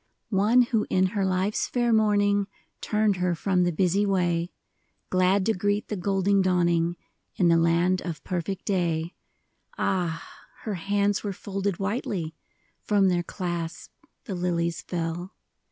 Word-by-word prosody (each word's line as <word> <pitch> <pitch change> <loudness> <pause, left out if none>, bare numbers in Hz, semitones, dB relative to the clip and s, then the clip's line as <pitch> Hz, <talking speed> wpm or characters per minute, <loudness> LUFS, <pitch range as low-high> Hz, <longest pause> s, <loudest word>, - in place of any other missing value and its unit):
One 215 +6 +5
who 225 -3 0
in 185 0 +3
her 200 -2 0
life's 190 +2 0
fair 240 -2 +1
morning 205 -2 +3 0.3
Turned 210 -2 +1
her 180 -1 0
from 185 +2 +1
the 175 - +1
busy 185 +4 +2
way, 175 -3 0 0.6
Glad 185 +1 +3
to 225 - +2
greet 205 +2 -1
the 210 - -2
golden 195 +1 +1
dawning 175 -2 +2 0.4
In 175 -2 +3
the 165 - +5
land 170 +2 +2
of 170 -3 -6
perfect 185 +1 -3
day, 170 -3 0 0.3
— - - -34
Ah, 170 -4 -1 0.4
her 215 - -3
hands 200 +3 0
were 205 -2 -2
folded 195 -1 -3
whitely! 195 -5 -2 0.5
From 200 -2 +3
their 175 -1 +1
clasp 175 -2 -5 0.3
the 200 - -4
lilies 170 -2 -1
fell 175 +2 -4
185 Hz, 145 wpm, -26 LUFS, 175-205 Hz, 0.6 s, One